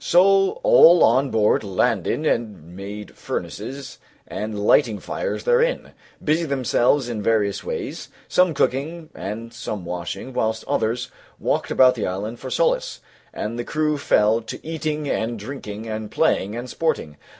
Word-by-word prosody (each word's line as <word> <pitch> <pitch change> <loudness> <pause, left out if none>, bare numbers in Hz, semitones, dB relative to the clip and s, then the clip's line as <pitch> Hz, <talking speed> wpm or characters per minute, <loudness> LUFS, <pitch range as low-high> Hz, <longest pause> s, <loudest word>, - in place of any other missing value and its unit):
So 195 - +4
all 340 - +7
on 135 +1 +4
board 110 -2 +2
landed 105 - 0
and 105 - -2
made 100 +1 -8
furnaces, 135 -1 -6 0.3
and 105 0 -4
lighting 115 -5 +4
fires - - -4
therein, 485 0 +1 0.3
busied 155 +1 +1
themselves 130 0 +2
in 115 -3 -3
various 105 -2 +1
ways, - - -5 0.2
some 180 -3 +3
cooking 155 +6 -1
and 115 +4 -6
some 105 -5 -5
washing, 90 +9 -5
whilst 110 -1 -1
other 110 +1 0
some 125 - -7 0.3
walked - - -1
about 130 -1 +5
the 115 - -3
island 105 +5 -4
for - - -7
solace, - - 0 0.3
and 115 +3 -4
the - - -1
crew 150 +3 0
fell 110 -4 +3
to 110 - -9
eating 155 -2 -3
and 115 -2 -1
drinking 110 -2 -7
and 110 -1 -4
playing 100 +3 +1
and 120 +2 -5
sporting. 125 - -2
120 Hz, 150 wpm, -22 LUFS, 105-155 Hz, 0.3 s, all